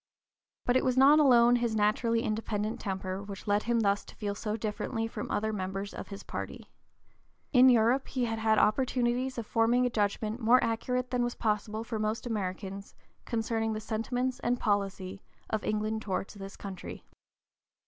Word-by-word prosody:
But 245 - +2
it 260 - +3
was 255 -1 +1
not 280 +3 +7
alone 245 -4 +6
his 235 -2 -1
naturally 230 +2 +2
independent 215 0 -2
temper 190 -1 -3
which 200 -1 -8
led 205 0 +2
him 235 0 +1
thus 200 -1 +1
to - - -13
feel 205 -2 -3
so 210 +1 -3
differently 225 +1 -2
from 225 -1 -5
other 220 +1 -1
members 195 +1 -4
of - - -7
his 200 -1 -8
party. - - -7 0.8
In 255 0 +8
Europe 245 +2 +3
he 255 -2 -1
had 225 -1 -2
had 220 0 +3
opportunities 250 +2 +1
of 230 - -3
forming 230 +3 +2
a 245 - 0
judgment 215 +1 -1
more 245 +2 +5
accurate 250 +2 -1
than 250 -1 +1
was 240 0 -2
possible 215 0 -1
for 230 -1 -4
most 215 +3 -2
Americans 195 -2 -4 0.3
concerning 225 -1 -1
the 215 - -3
sentiments 245 +4 -2
and 245 -1 0
policy 195 -2 -1 0.3
of 220 - -1
England 215 +1 -1
towards 195 -2 -3
this 195 -1 -9
country. 190 -3 -8
220 Hz, 170 wpm, -30 LUFS, 205-240 Hz, 0.8 s, In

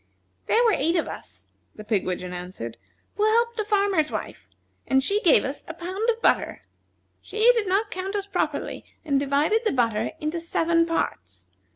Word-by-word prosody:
"There 470 - +4
were 455 -3 +4
eight 330 +3 +1
of 335 - +1
us," - - -9 0.3
the 215 - -9
pigwidgeon 185 -4 -2
answered, 180 -11 -6 0.4
"who 420 - +1
helped 465 +2 +2
a - - +2
farmer's 400 -7 +1
wife, - - -6 0.4
and 265 0 +3
she 405 +8 +1
gave 345 - +5
us 275 +2 -5
a 330 - -7
pound 375 +7 -2
of 465 0 -1
butter. - - +1 0.6
She - - -9 0.2
did 450 -4 0
not 405 +3 +1
count 380 +2 -4
us 400 -1 -1
properly, 400 - -2 0.2
and 280 -3 +2
divided 285 +10 +2
the 440 - +1
butter 230 -4 0
into 310 +3 -2
seven 335 0 +1
parts. 90 - -3
335 Hz, 175 wpm, -25 LUFS, 265-415 Hz, 0.6 s, gave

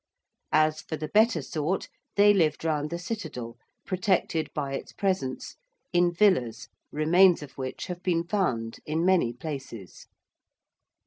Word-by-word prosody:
As 155 0 +3
for 160 - -5
the 155 0 -5
better 220 +2 +3
sort, 160 +4 -2 0.3
they 205 0 +6
lived 165 -4 +1
round 150 -2 0
the 170 - -3
Citadel, 170 - -6 0.3
protected 185 -4 0
by 140 -2 -3
its - - -6
presence, 185 -10 -2 0.4
in 175 0 +4
villas, 170 - +2 0.2
remains 175 +3 +4
of 145 - -10
which 130 -1 -5
have 180 -1 -6
been 175 -2 +1
found 130 - -1
in 160 +3 0
many 180 -10 +3
places. 125 - -8
165 Hz, 135 wpm, -27 LUFS, 140-185 Hz, 0.4 s, they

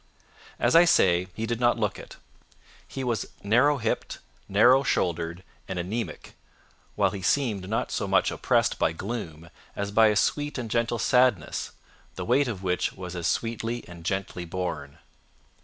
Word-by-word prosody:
As 120 +4 +2
I 165 - +9
say, 90 - +3
he 110 - -3
did 115 0 -2
not 120 -1 +3
look 105 -4 -1
it. - - -12 0.7
He 135 - -5
was 120 -6 -1 0.2
narrow 125 +8 +4
hipped, 115 -3 -2 0.3
narrow 120 +7 +6
shouldered, 85 -7 -1 0.2
and 95 - -4
anaemic, 95 0 -4 0.6
while - - +2
he 100 - -6
seemed 100 -2 0
not 110 - -1
so - - -2
much - - +2
oppressed - - +1
by 80 - +2
gloom 85 -5 -6 0.2
as 100 0 -3
by 110 +1 +5
a 105 - +2
sweet 145 +8 0
and 115 -4 -5
gentle 115 0 0
sadness, 125 -6 +1 0.4
the - - -5
weight 130 +4 +3
of 100 -6 -5
which 90 -1 0
was 90 -1 -8
as 85 -2 -2
sweetly 115 +3 -2
and 85 -1 -11
gently 95 0 -3
borne. 85 -5 -5
105 Hz, 160 wpm, -26 LUFS, 90-120 Hz, 0.7 s, I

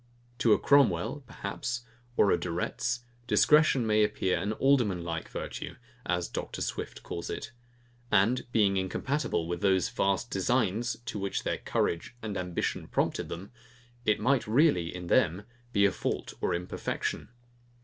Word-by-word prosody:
To 115 - +4
a - - +5
Cromwell, 140 - +3
perhaps, 120 +2 -4 0.3
or 100 - +5
a - - +3
De 90 - -4
Retz, 120 +8 -1 0.3
discretion 150 -5 +5
may 110 -1 +4
appear 105 -3 +1
an 100 - -1
alderman 115 -9 +2
like 85 -1 -4
virtue, - - -5 0.3
as 90 -1 0
Dr. - - -4
Swift - - -5
calls 85 0 -5
it; 115 - -5 0.6
and 110 +6 +3
being 100 -4 +3
incompatible 95 - -1
with 85 0 -3
those 95 -3 +3
vast 100 +4 0
designs, 115 +2 +1
to 105 - -4
which 100 0 -2
their - - -1
courage 85 +7 -1
and 105 -2 -3
ambition 90 -2 -2
prompted - - -1
them, 95 +6 -7 0.5
it 105 -2 +2
might 125 +2 +2
really, 115 - +4
in 90 0 -7
them, 95 -2 +2 0.3
be 100 -3 +4
a 100 - +4
fault - - -3
or - - +1
imperfection. 90 +1 -3
100 Hz, 150 wpm, -29 LUFS, 90-120 Hz, 0.6 s, a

